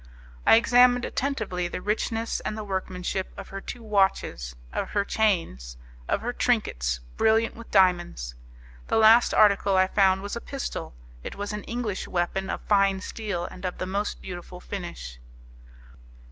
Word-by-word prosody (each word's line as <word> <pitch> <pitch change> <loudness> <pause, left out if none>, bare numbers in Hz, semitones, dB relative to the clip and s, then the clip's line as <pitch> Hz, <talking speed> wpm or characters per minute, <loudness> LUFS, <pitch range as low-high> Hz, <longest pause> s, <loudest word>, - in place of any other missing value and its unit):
I - - +9
examined 245 +1 +5
attentively 220 -10 -2
the 175 - -5
richness 225 +3 -1
and 215 - -4
the 215 - -4
workmanship 190 -1 -3
of - - -8
her 195 0 -6
two 240 +3 -8
watches, 190 - 0 0.2
of - - -2
her 200 -1 0
chains, 165 - 0 0.3
of - - 0
her 240 +2 -3
trinkets, - - 0 0.2
brilliant 225 +1 +3
with 230 0 -11
diamonds. 175 - +2 0.5
The - - +1
last 225 +2 +6
article 200 -2 +4
I 185 - +5
found 190 0 +3
was 205 - -4
a 235 - -5
pistol; 270 - -5 0.3
it - - -6
was 205 +1 -4
an 210 -1 -5
English 230 -5 -3
weapon 185 +2 -1
of - - -3
fine 195 -2 +3
steel, 200 -4 -4
and 180 - -10
of 180 -1 -3
the - - -3
most 200 +3 -3
beautiful 180 -1 -8
finish. 170 - -7
195 Hz, 160 wpm, -26 LUFS, 180-220 Hz, 0.5 s, I